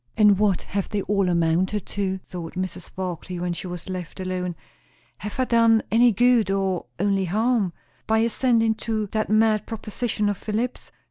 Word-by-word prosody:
And 210 -3 +5
what 205 -4 +2
have 200 0 -3
they 205 -2 -1
all 200 -2 +1
amounted 175 +4 +1
to? 190 -2 -2
thought 170 -2 -7
Mrs. 185 -1 -5
Barclay 180 -1 -4
when 175 0 -2
she 180 - -6
was 175 0 -7
left 185 -1 -6
alone. 180 -1 -3 0.6
Have 210 +4 -6
I - - +4
done 230 -2 +4
any 235 +2 +5
good 240 -1 +3
or 195 -5 0
only 195 0 +1
harm 215 +1 +1 0.4
by 220 +1 +3
acceding 230 -1 +2
to 220 -2 -1
that 215 -1 -1
mad 215 -1 +3
proposition 220 -1 -2
of 205 -2 0
Philip's? 225 +4 -3
205 Hz, 165 wpm, -24 LUFS, 185-220 Hz, 0.6 s, And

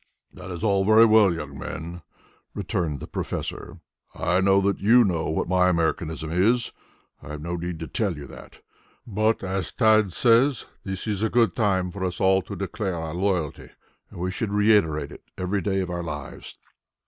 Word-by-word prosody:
"That 90 - -10
is 85 -2 -6
all 100 -3 +2
very 110 +3 +6
well, 110 -3 +5
young 75 -4 -6
men," 85 +5 -6 0.5
returned 90 - -2
the - - -7
professor. - - -5 0.3
"I 90 +3 +1
know 95 0 +4
that 100 0 0
you 120 +5 +6
know 85 -6 -1
what 80 - -1
my 90 0 +3
Americanism 80 -2 -1
is. 115 +8 +2 0.5
I - - -12
have 75 - -7
no 85 +1 -3
need 85 0 -4
to 80 - -4
tell 100 -8 -2
you 70 - -8
that, - - -13 0.4
but, 110 0 0
as 95 0 -3
Tad 110 -4 +3
says, 120 +6 +3 0.2
this 95 -1 -5
is 105 -3 -2
a 110 - +1
good 115 -7 +2
time 95 -5 +1
for 95 +1 -6
us 90 -1 -3
all 95 0 +4
to 95 - -8
declare 100 0 -3
our 80 -2 -5
loyalty, 90 -4 -2 0.4
and - - -11
we 90 +1 -2
should 100 +2 -3
reiterate 100 -9 +2
it - - -11 0.2
every 95 +2 -1
day 95 +1 0
of 90 -1 -4
our 85 0 -3
lives." 75 -3 -7
95 Hz, 185 wpm, -24 LUFS, 85-105 Hz, 0.5 s, very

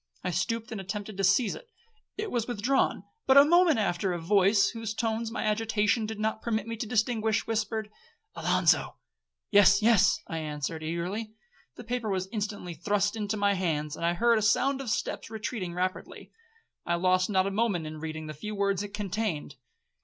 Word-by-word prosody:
I 180 - -1
stooped 225 +7 -2
and 215 -3 -4
attempted 205 +2 -5
to 195 - -1
seize 215 +5 +3
it. 480 -1 -11 0.5
It 425 0 -3
was 235 -2 -1
withdrawn: 245 +3 0 0.2
but 265 +1 +6
a 280 - +9
moment 345 -1 +5
after 185 -2 0
a 175 - -3
voice, 200 +3 +3
whose 225 -2 -5
tones 225 0 -1
my 225 - -4
agitation 215 0 +1
did 220 -1 -6
not 220 0 -1
permit 220 -3 -1
me 230 0 -4
to 225 - -4
distinguish, 220 -1 +1
whispered, 220 -1 -2 0.4
'Alonzo.'—'Yes,—yes,' 195 - +2
I 165 - -4
answered 150 0 -4
eagerly. 180 +7 -4 0.4
The - - -9
paper 240 -1 -3
was 190 -1 -1
instantly 205 -5 -4
thrust 205 +5 0
into 215 -1 -2
my 200 0 +2
hands, 155 -6 -1
and - - -7
I 170 +1 +2
heard 235 +3 +3
a - - -3
sound 265 +5 +2
of 260 - -5
steps 225 - -2
retreating 215 -5 -4
rapidly. 185 +1 -4 0.5
I 170 - 0
lost 185 +2 +2
not 190 -2 +2
a 195 - -1
moment 200 -6 0
in 155 0 -7
reading 155 0 -5
the 155 - -6
few 210 +8 -6
words 200 -1 0
it 205 0 -6
contained. 200 -7 -3
210 Hz, 180 wpm, -28 LUFS, 180-225 Hz, 0.5 s, a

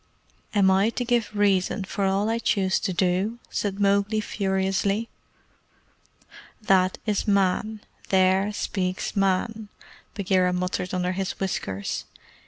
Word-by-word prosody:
"Am 195 -2 +5
I 195 +3 +3
to 245 +1 -3
give 235 -2 +1
reason 200 -1 +2
for 195 +1 -2
all 195 +2 +1
I 225 +1 0
choose 190 -4 +1
to, - - -2
do?" 185 +5 0
said 200 -1 -2
Mowgli 200 +2 +2
furiously. 195 +1 -1 1.5
"That 190 -3 +2
is 210 0 -1
Man! 200 +2 +1 0.3
There 190 +1 +3
speaks 185 -2 -3
Man!" 200 +3 0 0.5
Bagheera 185 -2 +2
muttered 180 0 -2
under 180 0 0
his 190 0 -2
whiskers. 100 - -3
195 Hz, 120 wpm, -25 LUFS, 185-205 Hz, 1.5 s, Am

